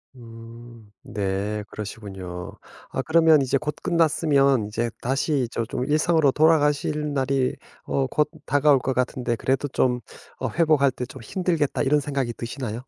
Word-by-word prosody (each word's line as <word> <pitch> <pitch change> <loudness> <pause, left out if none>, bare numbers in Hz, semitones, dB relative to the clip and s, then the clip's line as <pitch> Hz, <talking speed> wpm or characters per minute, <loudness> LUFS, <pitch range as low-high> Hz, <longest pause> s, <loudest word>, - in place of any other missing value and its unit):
음 115 -2 -13
네. 105 +1 -3
그러시군요. 95 -4 -7 0.4
아 - - -1
그러면 160 -2 +5
이제 135 +1 +1
곧 150 +2 -3
끝났으면 145 -8 +2
이제 115 +2 -2
다시 135 +2 0
이 - - -2
저 115 - -2
좀 125 +2 -3
일상으로 155 -1 +3
돌아가실 150 -1 +2
날이 135 -1 0 0.3
어 135 -1 0
곧 150 +1 +1 0.2
다가올 145 -1 +4
것 130 - -2
같은데 125 -1 -1
그래도 135 +2 0
좀 125 -2 +1 0.4
어 - - -2
회복할 155 -5 +3
때 125 - -5
좀 - - -11
힘들겠다 165 - -1
이런 145 +2 +2
생각이 135 -4 -2
드시나요? 120 -1 -5
135 Hz, 310 characters per minute, -24 LUFS, 115-150 Hz, 0.4 s, 그러면